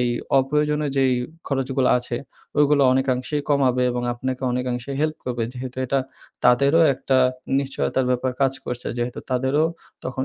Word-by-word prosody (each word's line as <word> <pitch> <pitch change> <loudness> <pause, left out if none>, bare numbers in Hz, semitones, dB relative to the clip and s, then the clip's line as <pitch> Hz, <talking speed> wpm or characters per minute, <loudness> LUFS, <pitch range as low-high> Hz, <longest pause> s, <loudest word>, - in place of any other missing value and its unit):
এই 125 - +2 0.3
অপ্রয়োজনীয় 150 +2 +1
যেই 135 -1 +3 0.3
খরচগুলা 135 -1 +1
আছে 120 -1 -4 0.4
ওইগুলো 145 -1 +4
অনেকাংশেই 130 +2 0
কমাবে 130 -3 +2
এবং 120 0 -2
আপনাকে 130 +1 -4
অনেকাংশে 125 +1 -2
হেল্প 155 0 0
করবে। 120 -2 -2
যেহেতু 125 0 -7
এটা 135 +2 +1 0.5
তাদেরও 140 +6 +5
একটা 130 0 +1 0.4
নিশ্চয়তার 130 -1 -1
ব্যাপার 125 +1 0
কাজ 135 -1 +3
করছে 125 0 -5
যেহেতু 120 +1 -3
তাদেরও 130 +4 +2 0.4
তখন 130 +1 -2
130 Hz, 140 wpm, -23 LUFS, 125-140 Hz, 0.5 s, তাদেরও